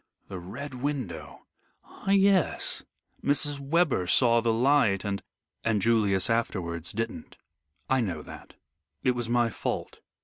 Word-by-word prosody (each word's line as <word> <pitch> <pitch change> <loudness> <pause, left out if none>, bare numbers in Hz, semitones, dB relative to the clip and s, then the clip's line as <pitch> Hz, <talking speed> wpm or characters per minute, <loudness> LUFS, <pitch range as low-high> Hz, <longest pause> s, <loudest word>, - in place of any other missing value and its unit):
"The 95 - -5
Red 130 +11 -7
Window. 90 - -4 0.4
Ah - - -9
yes! 195 -2 +3 0.4
Mrs. 145 0 +2
Webber 140 - +1
saw 115 +4 +4
the 115 0 +2
light, 115 -5 +3
and 100 -1 -2 0.2
" - - -57
"And 115 -2 +2
Julius 100 -3 +2
afterwards 90 -7 -1
didn't. 115 +2 -5 0.5
I 130 -1 +2
know 85 -9 -3
that. - - -12 0.5
It 125 - +4
was 120 -2 -3
my 120 -1 +2
fault. - - -4
115 Hz, 135 wpm, -28 LUFS, 100-140 Hz, 0.5 s, saw